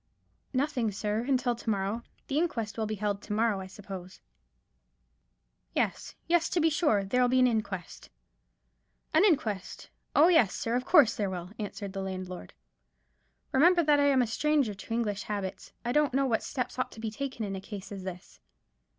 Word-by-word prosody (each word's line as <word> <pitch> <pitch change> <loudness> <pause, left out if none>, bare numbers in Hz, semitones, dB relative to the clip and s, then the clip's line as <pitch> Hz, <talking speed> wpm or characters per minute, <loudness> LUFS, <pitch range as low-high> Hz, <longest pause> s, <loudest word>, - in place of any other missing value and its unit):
"Nothing, 255 -5 0
sir, 210 +2 -1
until 255 -2 +2
to 230 - -5
morrow. 200 +2 -1 0.2
The 285 +2 0
inquest 230 - -1
will 220 -1 -2
be 215 - -2
held 205 -1 -2
to 210 - -5
morrow, 220 -2 +2
I 190 - -6
suppose." 190 -1 -9 1.6
"Yes—yes, 335 0 0
to 355 - +1
be 325 0 +3
sure. 295 - +2
There'll 250 +6 +2
be 255 +1 +2
an 255 - +6
inquest." 215 -7 -2 1.0
"An - - +5
inquest! 255 - 0 0.2
Oh, 305 +3 +7
yes, 320 - +4
sir; 230 +1 -1
of 250 +1 -1
course 295 -9 +6
there 205 -2 -1
will," 180 0 -6
answered 200 -2 -5
the 195 - -3
landlord. 185 - -6 1.0
"Remember 340 +6 +5
that 295 -1 +4
I 285 - +4
am 265 -3 +4
a - - 0
stranger 275 0 +1
to 200 +3 -12
English 215 -3 0
habits. 195 -2 -5
I 240 - 0
don't 295 -1 +2
know 275 0 +3
what 230 -4 +1
steps 255 -2 -4
ought 255 - -1
to - - -12
be 220 -1 -3
taken 255 -1 -4
in 195 - -4
such 190 0 -6
a - - -16
case 205 -3 -7
as 195 -1 -6
this. 185 0 -8
225 Hz, 185 wpm, -29 LUFS, 200-270 Hz, 1.6 s, Oh